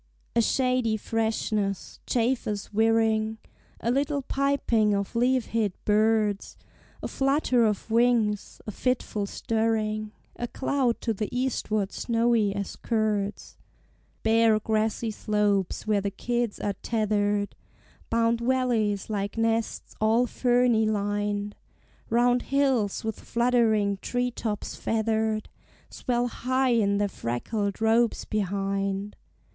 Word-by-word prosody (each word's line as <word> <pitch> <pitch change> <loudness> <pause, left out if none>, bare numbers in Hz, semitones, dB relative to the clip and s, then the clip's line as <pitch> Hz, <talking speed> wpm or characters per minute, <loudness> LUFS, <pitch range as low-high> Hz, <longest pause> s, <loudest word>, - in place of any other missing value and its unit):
A 235 - +5
shady 250 -2 +1
freshness, 215 -3 -2
chafers 230 -4 -1
whirring, 220 0 +2 0.4
A 235 - +1
little 280 +2 0
piping 255 -7 +1
of 200 +3 -3
leaf 250 +1 +2
hid 215 -4 +1
birds; 215 -1 +1 0.5
A - - -1
flutter 270 -4 +2
of 210 +1 -3
wings, 225 -3 +2
a 215 - -4
fitful 215 -3 -1
stirring, 215 -1 -1 0.3
A 240 - -3
cloud 260 -2 0
to 225 - 0
the 210 0 -3
eastward 220 -5 -1
snowy 230 -3 +1
as 200 -1 -4
curds. 210 -3 -2 0.7
Bare 225 -1 +4
grassy 220 +1 0
slopes, 210 -3 0
where 210 -2 +2
the 200 - -1
kids 235 +2 -2
are 205 - -1
tethered, 205 -2 0 0.5
Bound 230 0 +2
valleys 235 -5 +1
like 205 -1 -3
nests 225 0 -1
all 225 +3 +4
ferny 245 -2 +2
lined; 205 0 -1 0.5
Round 245 +1 +3
hills, 265 -7 +1
with 220 -1 -3
fluttering 230 -4 +2
tree 245 0 -1
tops 215 -4 -4
feathered, 220 -1 0 0.4
Swell 245 -1 -1
high 255 +2 0
in 205 -4 +2
their 205 0 +1
freckled 200 - -3
robes 225 +1 +2
behind. 195 0 -2
220 Hz, 115 wpm, -26 LUFS, 205-240 Hz, 0.7 s, A